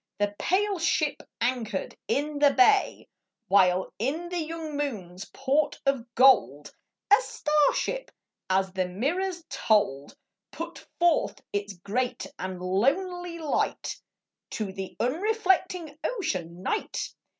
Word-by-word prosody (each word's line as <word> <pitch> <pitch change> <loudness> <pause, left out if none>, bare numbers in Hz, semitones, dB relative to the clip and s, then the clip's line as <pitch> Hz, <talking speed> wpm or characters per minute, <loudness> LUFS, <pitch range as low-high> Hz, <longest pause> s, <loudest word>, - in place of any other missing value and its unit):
The 205 0 0
pale 395 +1 +1
ship 310 -2 +1 0.2
anchored 230 -5 -1
in 290 +4 -1
the 290 0 +7
bay, 390 +5 +3 0.4
While 185 -1 +4
in 305 +10 -2
the 355 0 -2
young 320 -1 -5
moon's 200 -11 -4
port 280 +2 0
of 270 -4 +1
gold 230 - +4 0.4
A 415 - +8
star 300 - +2
ship - - -2 0.2
— - - -62
as 190 0 +2
the 185 -1 0
mirrors 340 - -2
told 205 - +1 0.2
— - - -62
Put 335 +1 -7
forth 345 -1 +2
its 205 0 -2
great 210 +8 -2
and 185 -1 -4
lonely 335 - 0
light 315 -3 -2 0.6
To 205 -4 -3
the 190 0 -6
unreflecting 365 - +1
Ocean, 185 - -3
Night. 430 - -2
275 Hz, 125 wpm, -27 LUFS, -, 0.6 s, A